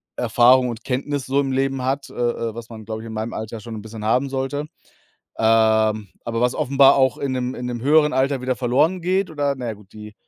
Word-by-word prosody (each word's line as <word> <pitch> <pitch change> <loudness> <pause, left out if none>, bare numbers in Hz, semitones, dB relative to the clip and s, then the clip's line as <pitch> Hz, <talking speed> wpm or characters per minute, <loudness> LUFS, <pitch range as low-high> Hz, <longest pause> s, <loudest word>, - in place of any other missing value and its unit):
Erfahrung 125 +2 +4
und 115 -1 -7
Kenntnis 135 +1 -2
so 135 +2 +1
im 135 -1 -2
Leben 135 0 0
hat, 135 +2 -2
äh, - - -14
äh, 115 -2 -2
was 115 0 -8
man, 110 -2 -10
glaube 110 0 -5
ich, 115 - -9
in 110 - -7
meinem 110 +2 -4
Alter 110 +1 -6
schon 110 +2 -8
'n 105 - -7
bisschen 110 0 -8
haben 125 +5 +1
sollte, 135 +2 -3 0.7
ähm, 110 -1 +3 0.2
aber 115 -1 -2
was 125 0 +2
offenbar 135 +1 +5
auch 130 -2 +3
in 140 - -2
'nem 125 0 -2
in 125 - -5
'nem 120 -1 -4
höheren 150 +2 +4
Alter 135 +1 +1
wieder 125 0 -1
verloren 140 +9 +1
geht 185 +1 0
oder, 145 -2 -1
na 125 - -5
ja 110 - -3
gut, 100 -2 -19
die 105 0 -11
125 Hz, 235 wpm, -21 LUFS, 110-135 Hz, 0.7 s, offenbar